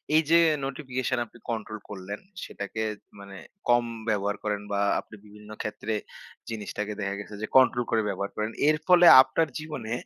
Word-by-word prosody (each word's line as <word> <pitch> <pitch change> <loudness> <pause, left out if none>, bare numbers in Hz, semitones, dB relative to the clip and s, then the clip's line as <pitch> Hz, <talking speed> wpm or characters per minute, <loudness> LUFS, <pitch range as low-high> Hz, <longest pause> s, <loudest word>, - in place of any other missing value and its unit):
এই 160 - +6
যে, 170 - +7 0.3
নোটিফিকেশন 130 -2 -3
আপনি 120 - -18
কন্ট্রোল 110 -2 -4
করলেন, 100 +1 -7 0.2
সেটাকে 100 +2 -6 0.4
মানে, 100 -1 -11 0.3
কম 120 0 +4 0.2
ব্যবহার 100 -1 0
করেন 105 -1 -2
বা 100 - 0 0.2
আপনি - - -11
বিভিন্ন 105 0 -15
ক্ষেত্রে 110 +1 -4 0.6
জিনিসটাকে 105 -1 -4
দেখা 100 0 -2
গেছে 105 0 -8
যে, 110 - -2
কন্ট্রোল 125 -2 +4
করে 115 -1 +3
ব্যবহার 100 0 -3
করেন। 105 +1 -2 0.2
এর 155 - +3
ফলে, 180 -1 +7 0.2
আপনার 130 +5 +1
জীবনে 150 -8 -6
110 Hz, 160 wpm, -27 LUFS, 105-130 Hz, 0.6 s, যে